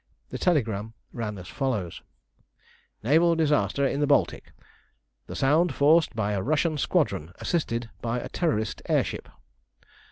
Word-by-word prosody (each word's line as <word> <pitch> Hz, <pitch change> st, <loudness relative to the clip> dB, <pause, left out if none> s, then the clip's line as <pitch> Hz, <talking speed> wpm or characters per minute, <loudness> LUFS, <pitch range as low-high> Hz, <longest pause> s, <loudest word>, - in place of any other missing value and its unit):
The -, -, -5 dB
telegram 110 Hz, -, 0 dB, 0.2 s
ran 105 Hz, -3 st, -4 dB
as 90 Hz, -1 st, -9 dB
follows: 110 Hz, -, -3 dB, 1.0 s
NAVAL 165 Hz, +7 st, +4 dB
DISASTER 150 Hz, -3 st, +2 dB
IN 140 Hz, -, 0 dB
THE 145 Hz, -, +2 dB
BALTIC. 140 Hz, -, +1 dB, 0.8 s
_The -, -, -5 dB
Sound 150 Hz, +3 st, +3 dB
forced 155 Hz, -1 st, +4 dB
by 105 Hz, -2 st, 0 dB
a 100 Hz, -2 st, -1 dB
Russian 155 Hz, -, +1 dB
Squadron, 80 Hz, -, 0 dB
assisted 120 Hz, -9 st, -2 dB
by 115 Hz, +1 st, -1 dB
a -, -, -6 dB
Terrorist 115 Hz, -, -1 dB
Air -, -, +4 dB
Ship. -, -, -6 dB
135 Hz, 135 wpm, -26 LUFS, 110-155 Hz, 1.0 s, NAVAL